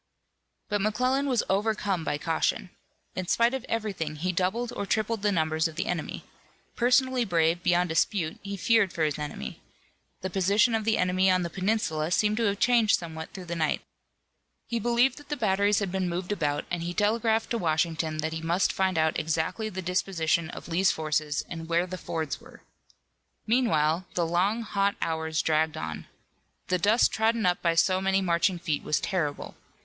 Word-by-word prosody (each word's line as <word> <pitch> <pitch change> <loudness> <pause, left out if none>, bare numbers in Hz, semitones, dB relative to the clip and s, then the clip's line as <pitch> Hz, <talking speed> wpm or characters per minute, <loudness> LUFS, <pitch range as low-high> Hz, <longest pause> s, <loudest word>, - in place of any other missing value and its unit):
But 205 -1 -1
McClellan 255 +7 +1
was 250 -4 +1
overcome 200 -3 0
by 145 - -1
caution. 165 +3 -1 0.4
In 185 -1 -3
spite 235 +5 +3
of 265 -2 -3
everything 195 -9 -2
he 180 +5 -1
doubled 200 +7 -1
or 200 - -3
tripled 220 +1 0
the 205 0 +2
numbers 160 -2 +1
of 160 - -10
the - - -2
enemy. 175 -4 -3 0.5
Personally 250 +1 +3
brave 170 -3 +1
beyond 175 0 +2
dispute, 160 +1 0
he 200 0 -5
feared 220 -2 +3
for 165 - -1
his 150 -1 0
army. 145 - -6 0.6
The 190 - -4
position 200 +5 +3
of 220 -1 0
the 220 0 +2
enemy 185 +1 +2
on 185 -1 +3
the 170 - -4
peninsula 185 -6 -1
seemed 210 +4 +2
to 230 - +1
have 200 -1 +1
changed 235 -1 +4
somewhat 160 -2 -7
through 185 -2 -8
the 170 0 -4
night. 155 -2 0 0.8
He 235 - -2
believed 240 +4 +2
that 290 - -16
the 295 - -2
batteries 205 -2 +2
had 200 -3 -1
been 190 -1 -1
moved 180 +3 -3
about, 150 -7 -1
and 175 -1 -1
he 175 +1 -4
telegraphed 225 +1 +1
to 235 - 0
Washington 160 -1 0
that 160 - -2
he 160 - -4
must 170 +4 +1
find 190 -2 0
out 160 0 +2
exactly 160 +8 -1
the 190 -2 -6
disposition 170 -2 0
of - - -9
Lee's 180 +3 +2
forces 155 -1 -1
and 165 -1 -7
where 170 +1 +2
the 185 0 -7
fords 160 -3 -4
were. - - -16 0.8
Meanwhile 185 -8 +2
the 175 - +1
long, 190 +7 +1
hot 200 -1 0
hours 160 -1 -1
dragged 155 0 +1
on. 80 0 -5 0.6
The 185 - +2
dust 210 +7 +4
trodden 220 0 +1
up 180 0 +2
by 170 -1 +1
so 185 +2 +3
many 195 0 +2
marching 180 0 +1
feet 165 -4 -2
was 150 - 0
terrible. 150 -6 -2
185 Hz, 185 wpm, -27 LUFS, 165-215 Hz, 0.8 s, changed